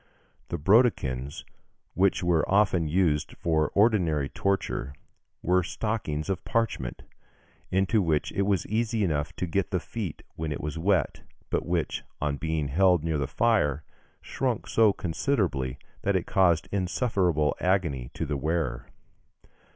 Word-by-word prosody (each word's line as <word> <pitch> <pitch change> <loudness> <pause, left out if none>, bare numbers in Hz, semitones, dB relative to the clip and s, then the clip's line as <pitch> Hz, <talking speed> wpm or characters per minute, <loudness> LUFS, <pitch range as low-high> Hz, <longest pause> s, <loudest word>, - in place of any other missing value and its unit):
The 85 - -3
brodequins 75 - +2 0.5
which 95 -1 +2
were 85 -2 +3
often 95 -5 +3
used 75 -3 +1
for 80 -3 +1
ordinary 90 -10 +3
torture 95 -8 -1 0.5
were 90 +1 +3
stockings 90 -6 -3
of 95 -2 -2
parchment, 115 - -2 0.7
into 95 +3 +2
which 80 -4 0
it - - -1
was 100 -3 +1
easy 110 0 0
enough 75 -1 -1
to - - -2
get 95 +2 -1
the 95 - 0
feet 100 -7 -6
when 80 -1 -4
it 75 - -3
was 75 +1 -4
wet, 95 +2 +1 0.3
but - - -1
which, - - -1 0.2
on 70 -1 -1
being 80 -2 -2
held 90 +1 +3
near 80 -2 0
the 70 - -1
fire, 80 - +1 0.4
shrunk - - -2
so 110 -2 +4
considerably 85 - -1 0.2
that 100 0 +1
it 90 - 0
caused 85 -4 +3
insufferable 90 - +1
agony 85 -10 0
to 80 - -2
the 75 -1 -2
wearer. 75 -4 -2
85 Hz, 140 wpm, -27 LUFS, 75-100 Hz, 0.7 s, so